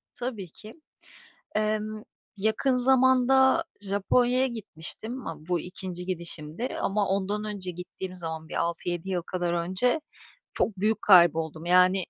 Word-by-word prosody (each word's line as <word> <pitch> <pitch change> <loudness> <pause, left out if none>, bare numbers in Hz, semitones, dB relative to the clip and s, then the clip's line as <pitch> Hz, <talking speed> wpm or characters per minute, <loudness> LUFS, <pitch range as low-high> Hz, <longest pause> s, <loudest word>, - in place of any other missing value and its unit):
Tabii 235 -7 -5
ki. 220 +9 -13 0.7
Emm, 215 0 -1 0.3
yakın 220 +6 +1
zamanda 260 +3 +4 0.2
Japonya'ya 240 +6 +2
gitmiştim. 225 +2 -7
Ama 155 -1 -7
bu 175 -2 +1
2'nci 180 0 -7
gidişimdi 170 +4 -4
ama 200 0 +1
ondan 200 +2 -1
önce 200 -4 -4
gittiğim 180 +1 -7
zaman 160 -3 -6
bir - - -8
6-7 170 +1 -2
yıl 180 -2 0
kadar 175 0 -2
önce 185 - +1 0.5
çok 195 -4 0
büyük 215 +2 +1
kayboldum, 165 -4 +5
yani, 180 +1 +5
195 Hz, 125 wpm, -27 LUFS, 175-225 Hz, 0.7 s, kayboldum